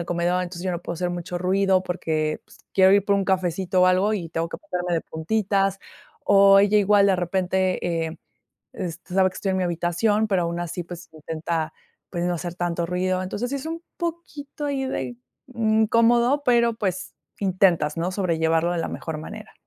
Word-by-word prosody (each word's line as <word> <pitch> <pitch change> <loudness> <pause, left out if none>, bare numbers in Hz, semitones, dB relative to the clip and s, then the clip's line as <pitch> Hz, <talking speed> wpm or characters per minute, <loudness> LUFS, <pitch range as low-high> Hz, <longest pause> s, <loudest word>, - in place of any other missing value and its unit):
el 170 - -3
comedor, 175 +1 0
entonces, 175 0 -6
yo 185 - -1
no 170 - -3
puedo 170 - -4
hacer 180 +1 -2
mucho 175 0 -4
ruido 190 +1 +2
porque, 155 -4 -2
pues, - - -19 0.2
quiero 190 0 +6
ir 200 -1 +4
por 200 - +2
un 195 - 0
cafecito 185 0 +1
o - - +6
algo 185 +4 +3
y 170 -5 -4
tengo 165 +1 -2
que - - -7
ponerme 180 - -3
de 165 - +1
puntitas. 195 +3 0 0.5
O 195 0 +7
ella 205 +1 +3
igual, 200 0 +4
de 190 -2 +3
repente, 180 -2 0
eh, 160 - -8 0.5
este, 180 -2 -7
sabe 190 -1 +4
que - - -18
estoy 195 - -2
en 190 - 0
mi 185 - +1
habitación, 175 +6 +1
pero 190 -3 +2
aun 170 +1 -3
así, 175 +1 -4
pues, 175 0 -10
intenta, 160 0 -3 0.4
pues, 175 -1 -2
no 175 0 0
hacer 175 +1 -5
tanto 170 -1 -1
ruido. 185 +1 -1
Entonces, 205 +6 -3
sí 280 - -1
es 275 - -6
un 330 +1 -5 0.2
poquito 305 -4 -5
ahí 270 -2 -1
de 125 - -4 0.4
incómodo, 230 +4 +3
pero, 235 -2 +3
pues, 190 -4 -3 0.3
intentas, 180 -5 +2
¿no?, 180 +3 -1
sobrellevarlo 165 -2 +1
de 175 - -2
la 165 - -2
mejor 160 -2 -5
manera. 155 - -9
185 Hz, 195 wpm, -24 LUFS, 170-200 Hz, 0.5 s, O